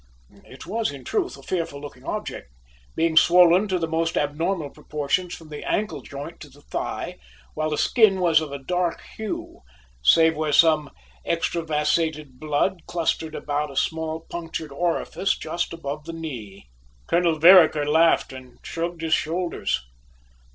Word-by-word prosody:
It - - -12
was, 220 +3 -1
in 140 -2 -10
truth, 125 - -2
a 135 - -14
fearful 165 -3 -3
looking 145 0 -11
object, 60 - -5 0.4
being 160 0 +1
swollen 180 +4 +6
to 185 -2 0
the 165 -2 -2
most 165 +1 -1
abnormal 155 +1 -1
proportions 150 +5 -2
from 160 -2 -14
the 150 - -7
ankle 210 +1 -1
joint 145 +4 -8
to 150 - -11
the 140 +2 -19
thigh, - - -4 0.3
while 155 0 -1
the 150 - -2
skin 215 -6 +4
was 165 -3 +4
of 155 -3 -6
a 140 - -4
dark 175 +5 -1 0.2
hue, 220 -2 -5 0.4
save 160 - +5
where 155 -1 -1
some 155 -3 +4 0.3
extravasated 155 -4 -1
blood 155 +4 -1
clustered 160 -2 -1
about 150 0 -2
a 135 - -11
small 160 +2 -1
punctured 165 -3 -6
orifice 175 +5 -1
just 170 +2 -3
above 150 -2 -6
the 165 - -6
knee. 120 - -7 0.4
Colonel 170 -2 +2
Vereker 160 -3 +7
laughed 160 -2 +3
and 130 -2 -12
shrugged 170 0 -4
his 160 -1 +1
shoulders. 170 - -1
160 Hz, 150 wpm, -24 LUFS, 145-170 Hz, 0.4 s, Vereker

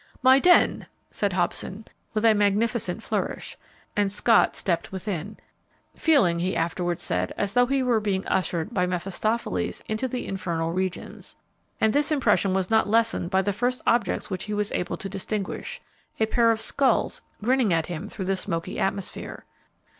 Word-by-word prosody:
"My 260 +1 +7
den!" 355 +4 +4 0.2
said 200 -3 -1
Hobson, 190 +3 -2 0.3
with 215 +1 +1
a 225 - +7
magnificent 210 0 +1
flourish, - - -3 0.4
and 205 -1 +1
Scott 220 +2 +3
stepped 170 -3 -1
within, 190 +1 -4 0.6
feeling, 230 - +3
he 185 +2 -1
afterwards 175 +1 -1
said, 90 0 -1
as 200 -1 -1
though 245 0 +4
he 270 0 +1
were 240 -3 +2
being 200 -3 -1
ushered 185 +2 -1
by 180 -3 +1
Mephistopheles 195 +6 -2
into 220 +4 -1
the 250 0 -4
infernal 165 -4 -2
regions, 185 0 -4 0.4
and 220 -1 +3
this 290 +2 +2
impression 205 -9 +2
was 190 +1 -1
not 220 -1 +3
lessened 225 -5 +2
by 190 0 +2
the 205 - 0
first 245 +5 0
objects 230 -6 +1
which 185 - -3
he 210 0 -3
was 205 0 -1
able 180 - -2
to - - -5
distinguish, 195 +1 -4 0.4
a 220 - +4
pair 230 +1 +3
of 225 -1 +2
skulls 260 +1 +1 0.2
grinning 250 -3 +2
at 165 -1 +2
him 170 -2 -6
through 190 - -5
the 195 +1 +1
smoky 165 -3 -3
atmosphere. 195 -1 -3
205 Hz, 165 wpm, -25 LUFS, 185-230 Hz, 0.6 s, My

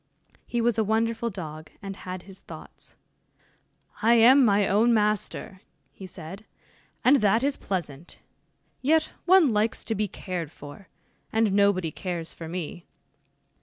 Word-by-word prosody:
He 240 - -1
was 230 -1 +1
a - - +3
wonderful 230 +2 0
dog, 155 -6 -8
and 195 -1 -7
had 185 -1 -7
his 195 -1 -12
thoughts. - - -12 1.1
"I 230 +2 +5
am 255 +4 +7
my 205 -3 +3
own 230 +4 +3
master," 210 -2 -1 0.3
he 190 - -10
said, 185 +3 -9 0.6
"and 275 +3 +7
that 220 +1 +2
is 280 0 +1
pleasant 170 -5 -5 0.6
yet 315 +4 +2
one 360 -9 +5
likes 210 +2 0
to 225 - -2
be 210 0 -1
cared 175 -5 -5
for, 145 +7 -12 0.4
and 220 -3 +2
nobody 200 -5 +2
cares 170 -2 -5
for 165 - -8
me. 175 0 -6
200 Hz, 140 wpm, -26 LUFS, 180-230 Hz, 1.1 s, am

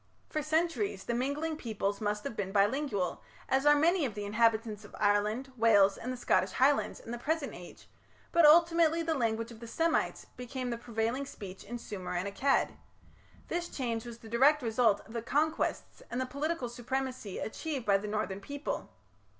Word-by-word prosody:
For 310 - -1
centuries 330 +6 0
the 235 - -2
mingling 285 +6 -1
peoples 205 -5 -2
must 210 0 -1
have - - -5
been 195 -2 -3
bilingual, 205 - +1 0.3
as 270 +2 +2
are 295 - +8
many 335 +4 +3
of 245 -6 -2
the 205 -1 -4
inhabitants 220 0 +1
of - - -12
Ireland, 210 +6 +1
Wales, 205 -4 +5
and 250 - -5
the 255 - -4
Scottish - - +1
Highlands 280 +2 +2
in 230 - -9
the 240 - -4
present 305 +1 -1
age, 175 0 -12 0.4
but 340 - +4
ultimately 330 +1 +6
the 325 0 0
language 230 -4 -1
of 225 - -11
the 235 - -9
Semites 325 +7 0
became 250 0 -4
the 235 - -2
prevailing 235 +3 -2
speech 190 -6 -9
in 240 +3 -6
Sumer 190 -6 -6
and 180 +3 -1
Akkad. 270 +7 +1 0.7
This 345 0 -2
change 230 -4 -2
was 235 -1 -8
the 230 - -13
direct 270 +6 +4
result 225 -2 +3
of 220 - -13
the 230 - -2
conquests 310 +7 -1
and 245 - -3
the 260 - 0
political 280 +1 -2
supremacy 250 -3 -4
achieved 275 +2 -4
by 200 -1 +4
the 210 - -6
northern 205 -2 -2
people. 285 +7 -4
240 Hz, 180 wpm, -31 LUFS, 215-290 Hz, 0.7 s, are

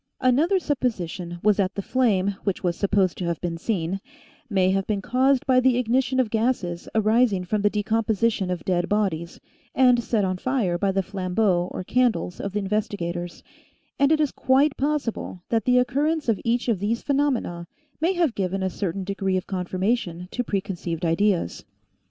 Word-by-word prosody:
Another 290 +10 +3
supposition 190 - -2
was 210 -1 +4
that 195 -2 0
the 200 - -2
flame, 200 -6 +1
which 195 -2 -2
was 175 -2 0
sup 200 - -1
posed 190 -5 +2
to 180 - -2
have 170 -2 -2
been 170 -2 -4
seen, 190 -1 -2 0.5
may 190 -3 +2
have 195 0 0
been 210 -2 0
caused 255 +4 +2
by 255 -1 +4
the 255 -1 +3
ignition 255 +2 +1
of 240 -5 +1
gases 220 -7 -1
arising 220 -3 +3
from 210 +3 -1
the 205 - +3
decomposition 215 -1 0
of 180 -2 -3
dead 180 -1 0
bodies, 185 -6 -1 0.4
and 250 -2 +4
set 220 -4 +1
on 185 -1 -1
fire 230 -6 0
by 195 0 +1
the 195 0 0
flambeaux 185 -1 0
or - - -5
candles 235 -5 0
of 200 - -4
the - - -1
investigators, 190 -4 -3 0.6
and 280 +1 +4
it 315 - +4
is 300 -3 +1
quite 275 +2 +2
possible 270 -10 -2
that 225 -1 +1
the 250 0 +4
occurrence 290 +5 +1
of 225 -4 +1
each 240 +1 0
of 225 -6 +1
these 220 +4 -1
phenomena 265 -12 0 0.3
may 335 +5 +2
have 340 -8 +1
given 195 -1 -2
a 190 - -1
certain 195 +1 -3
degree 195 -1 -1
of 185 - -3
confirmation 185 -1 -2
to 245 - -2
preconceived 185 -5 -3
ideas. 170 - +1
205 Hz, 180 wpm, -24 LUFS, 185-250 Hz, 0.6 s, was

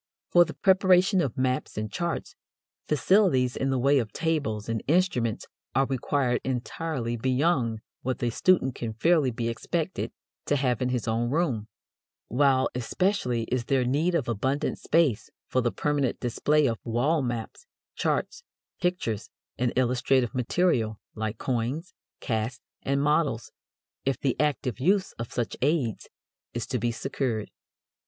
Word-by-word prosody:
For 175 0 +7
the - - -8
preparation 190 0 +4
of 135 -7 -2
maps 130 -3 -1
and 105 -1 -3
charts, 170 - -3 0.5
facilities 150 -6 +3
in 135 - -1
the 135 - +1
way 140 +3 +4
of 110 -4 -3
tables 140 -11 -1
and 115 -1 -1
instruments 135 - +1 0.3
are 135 +1 +4
required 130 -1 0
entirely 130 0 -2
beyond 130 -2 +1 0.2
what 130 0 -2
the 120 -2 -1
student 135 -2 +3
can 115 -2 -4
fairly 155 +3 +3
be 115 -1 -3
expected 115 -1 -2 0.4
to 145 - +3
have 130 -4 0
in 125 - +1
his 125 -2 -2
own 115 +1 0
room; 135 -8 0 0.6
while 130 +1 +3
especially 125 - 0
is 125 -2 0
there 130 -1 +2
need 155 +8 +1
of 145 - 0
abundant 130 +5 -1
space 155 -9 +2 0.2
for 130 - +1
the 120 -1 +1
permanent 145 -4 0
display 145 +5 +2
of 115 -4 0
wall 135 +8 +1
maps, 120 - -4 0.3
charts, 380 - -1 0.4
pictures, 115 - -1 0.3
and 125 -1 +1
illustrative 125 0 +2
material, 125 - +1
like 110 0 -3
coins, 130 +9 -2 0.3
casts, 115 +1 -2 0.2
and 140 +1 0
models, 145 -6 +1 0.5
if 135 -3 0
the 135 -3 0
active 140 -5 0
use 190 +7 +2
of 115 - -5
such 120 -2 -2
aids 135 -5 0 0.5
is 120 - -2
to 125 - -2
be 120 +2 0
secured. 115 -2 -2
130 Hz, 145 wpm, -27 LUFS, 120-150 Hz, 0.6 s, For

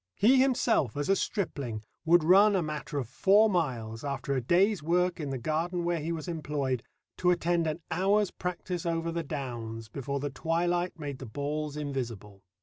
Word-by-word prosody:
He 255 +6 +5
himself 235 - +2
as 145 +3 -2
a 195 - +5
stripling 140 - -3 0.2
would 170 0 +5
run 195 +5 +6
a 185 - +2
matter 150 0 -4
of 130 -5 -2
four 200 - +4
miles, 120 - -2
after 140 -1 -2
a 130 - 0
day's 185 - +3
work 175 +3 +1
in 150 -3 -3
the 135 - -2
garden 165 +7 -1
where 170 -1 0
he 160 +2 -3
was 165 +1 -4
employed, 145 -6 -2 0.4
to 180 - +2
attend 170 -1 +2
an 155 +2 -3
hour's 195 +3 +2
practice 180 -1 -4
over 165 0 -1
the 170 0 -2
downs 120 -7 -5
before 140 +3 -3
the 145 +1 -3
twilight 175 +5 0
made 145 -4 -5
the 130 - -7
balls 145 +4 -3
invisible. 120 -9 -5
155 Hz, 180 wpm, -29 LUFS, 135-175 Hz, 0.4 s, run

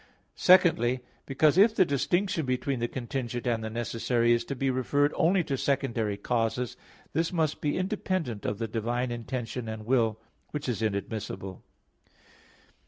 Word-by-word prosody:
Secondly, 160 -10 +4 0.3
because 150 +5 +3
if 215 +2 +6
the 185 - +5
distinction 170 +6 0
between 130 0 -1
the 120 - 0
contingent 120 -1 -4
and 115 -2 0
the 110 - -3
necessary 120 +1 0
is 120 - +1
to 140 - -4
be 135 +1 0
referred 145 +3 +1
only 180 +3 +3
to 140 - -2
secondary 120 -7 0
causes, 115 +2 -1 0.4
this 165 +3 0
must 160 -4 0
be 145 - 0
independent 185 - -2
of 105 - -2
the 115 +1 -2
divine 120 +3 -2
intention 120 0 -4
and 110 -1 -6
will; 115 -3 +2 0.3
which 150 -1 -5
is 120 -3 -2
inadmissible. 100 -3 -3
125 Hz, 150 wpm, -28 LUFS, 115-150 Hz, 0.4 s, if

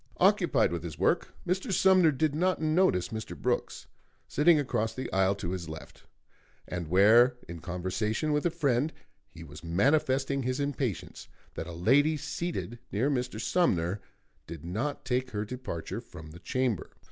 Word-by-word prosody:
Occupied - - +3
with 85 -1 -3
his 80 -3 -7
work, - - +1
Mr. 190 +5 -1
Sumner 185 -3 +5
did 150 +1 0
not 180 +4 +1
notice 155 - +2
Mr. 110 -2 -6
Brooks, - - -2 0.4
sitting 155 +3 +4
across 110 -5 -1
the 130 - -5
aisle 95 +1 +3
to 90 -3 -4
his 90 -3 -5
left, 80 -1 -10 0.6
and 90 -2 -4
where 110 +8 +5
in 85 0 -7
conversation 100 - -2
with 150 - +1
a - - +1
friend 145 -3 +1 0.4
he 80 - -11
was 75 0 -11
manifesting 135 - +1
his 130 +1 -2
impatience 140 - -3 0.3
that - - -5
a - - -6
lady 140 - +3
seated 150 -6 -4
near 125 +9 +1
Mr. 125 -4 -2
Sumner 100 - +1 0.5
did 80 -2 -8
not 110 +12 -3
take 130 0 0
her 105 -3 -3
departure 125 -8 -5
from 80 -1 -12
the 85 - -12
chamber. 125 -1 -1
120 Hz, 160 wpm, -29 LUFS, 90-145 Hz, 0.6 s, Sumner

